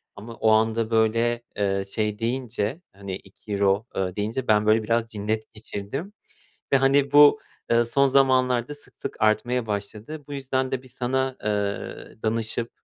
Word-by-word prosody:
Ama 115 Hz, +3 st, -9 dB
o 110 Hz, -, +2 dB
anda, 110 Hz, +1 st, +2 dB
böyle, 115 Hz, +1 st, +2 dB, 0.2 s
eee, 100 Hz, -1 st, 0 dB
şey 105 Hz, -2 st, -1 dB
deyince, 120 Hz, -, -2 dB
hani, 100 Hz, -1 st, -6 dB
€2, 100 Hz, +2 st, -1 dB
eee, 95 Hz, -1 st, -2 dB
deyince 110 Hz, +5 st, -2 dB
ben, 105 Hz, -1 st, +4 dB
böyle, 110 Hz, +1 st, +4 dB
biraz 115 Hz, +1 st, 0 dB
cinnet 110 Hz, +1 st, -3 dB
geçirdim 110 Hz, -, -6 dB, 0.6 s
ve, -, -, +7 dB
hani, 135 Hz, +1 st, +3 dB
bu, 145 Hz, +9 st, +7 dB, 0.3 s
eee, 120 Hz, 0 st, +4 dB
son 140 Hz, +4 st, +3 dB
zamanlarda 130 Hz, -1 st, +3 dB
sık 145 Hz, -, -14 dB
sık -, -, -5 dB
artmaya 115 Hz, +3 st, +2 dB
başladı. 105 Hz, +8 st, -5 dB
Bu 145 Hz, -, -9 dB
yüzden 130 Hz, -1 st, -1 dB
de 130 Hz, -1 st, -1 dB
bir 130 Hz, -, -15 dB
sana, 130 Hz, +1 st, -1 dB
eee, 105 Hz, +1 st, -3 dB
danışıp 115 Hz, +1 st, -1 dB
115 Hz, 155 wpm, -25 LUFS, 105-130 Hz, 0.6 s, ve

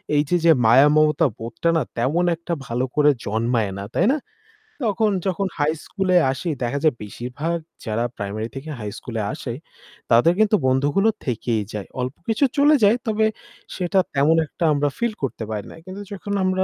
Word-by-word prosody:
এই 145 Hz, -, +4 dB
যে 180 Hz, -, +3 dB
যে 165 Hz, -, +8 dB
মায়া 130 Hz, +6 st, +7 dB
মমতা 155 Hz, 0 st, +4 dB
বোধটা 115 Hz, +8 st, -2 dB
না -, -, +2 dB, 0.2 s
তেমন 145 Hz, +9 st, +1 dB
একটা 170 Hz, +1 st, -5 dB
ভালো 125 Hz, +2 st, -1 dB
করে 150 Hz, 0 st, +5 dB, 0.2 s
জন্মায় 110 Hz, 0 st, 0 dB
না। 100 Hz, -, -5 dB
তাই -, -, +3 dB
না? -, -, 0 dB, 0.7 s
তখন 215 Hz, 0 st, +2 dB, 0.2 s
যখন 190 Hz, +1 st, 0 dB
হাই 145 Hz, 0 st, +2 dB
স্কুলে 190 Hz, -2 st, 0 dB, 0.2 s
আসি 135 Hz, +6 st, -4 dB
দেখা 125 Hz, +4 st, -1 dB
যায় 155 Hz, -5 st, +3 dB
বেশিরভাগ 125 Hz, +10 st, -4 dB, 0.3 s
যারা 110 Hz, 0 st, -1 dB
প্রাইমারি 105 Hz, +2 st, -4 dB
থেকে 135 Hz, +4 st, -7 dB
হাইস্কুলে 110 Hz, +2 st, -5 dB
আসে 135 Hz, -5 st, -5 dB, 0.6 s
তাদের 120 Hz, +9 st, +5 dB
কিন্তু 215 Hz, 0 st, +4 dB
বন্ধুগুলো 145 Hz, +11 st, +2 dB, 0.2 s
থেকেই 115 Hz, -2 st, -1 dB
যায়। 105 Hz, -2 st, -5 dB
অল্প 130 Hz, +3 st, -3 dB
কিছু 225 Hz, +6 st, +3 dB
চলে 290 Hz, +2 st, +6 dB
যায় 210 Hz, +4 st, +5 dB
তবে 220 Hz, 0 st, +2 dB, 0.5 s
সেটা 185 Hz, +1 st, +1 dB
তেমন 145 Hz, +3 st, +4 dB
একটা 160 Hz, -, -6 dB
আমরা 145 Hz, 0 st, +1 dB
ফিল 235 Hz, -1 st, 0 dB
করতে 125 Hz, -3 st, -3 dB
পারি 105 Hz, -2 st, -3 dB
না। -, -, -11 dB
কিন্তু 190 Hz, +2 st, -8 dB
যখন 200 Hz, 0 st, -5 dB
আমরা 185 Hz, 0 st, +1 dB
145 Hz, 175 wpm, -22 LUFS, 120-185 Hz, 0.7 s, যে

